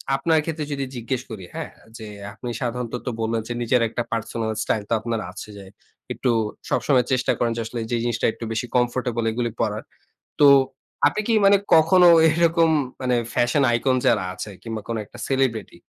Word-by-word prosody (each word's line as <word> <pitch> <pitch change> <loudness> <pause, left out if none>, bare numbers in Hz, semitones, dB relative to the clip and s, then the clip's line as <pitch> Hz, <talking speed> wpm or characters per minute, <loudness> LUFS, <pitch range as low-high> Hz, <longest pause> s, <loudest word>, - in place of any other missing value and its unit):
আপনার 160 +3 +2
ক্ষেত্রে 155 -2 -3
যদি 140 -1 -2
জিজ্ঞেস 120 +2 -3
করি, 105 -4 -7
হ্যাঁ - - -5 0.3
যে 110 - -9 0.3
আপনি 120 +3 -7
সাধারণত 125 -1 -3 0.3
বললেন 110 0 0
যে 120 - -3
নিজের 120 +1 +2
একটা 120 - -3
পার্সোনাল 115 0 -2
স্টাইল 105 - -1
তো - - +1
আপনার 115 0 -3
আছে 100 +3 -9
যাই। 95 0 -12 0.4
একটু 125 - 0 0.4
সবসময় 130 -4 +2
চেষ্টা 130 0 +2
করেন 120 -1 0
যে - - -1
আসলে 120 +1 -5
যে 120 - +1
জিনিসটা 120 -1 -1
একটু - - -10
বেশি 115 +2 -2
কমফোর্টেবল 120 -1 0
এগুলি 120 0 -2
পড়ার। 105 0 -1 0.6
তো 145 - +8 0.6
আপনি 185 +9 +1
কি 225 - +3
মানে 200 0 +7 0.2
কখনো 175 +3 +6 0.2
এরকম 165 0 +3 0.3
মানে 125 -1 +1 0.2
ফ্যাশন 125 +4 +2
আইকন 130 +2 +2
যারা 105 -5 +3
আছে 105 - -6
কিংবা 115 -2 -5
কোন 115 - -2
একটা - - -15
সেলিব্রিটি 130 -5 -1
120 Hz, 175 wpm, -23 LUFS, 115-135 Hz, 0.6 s, তো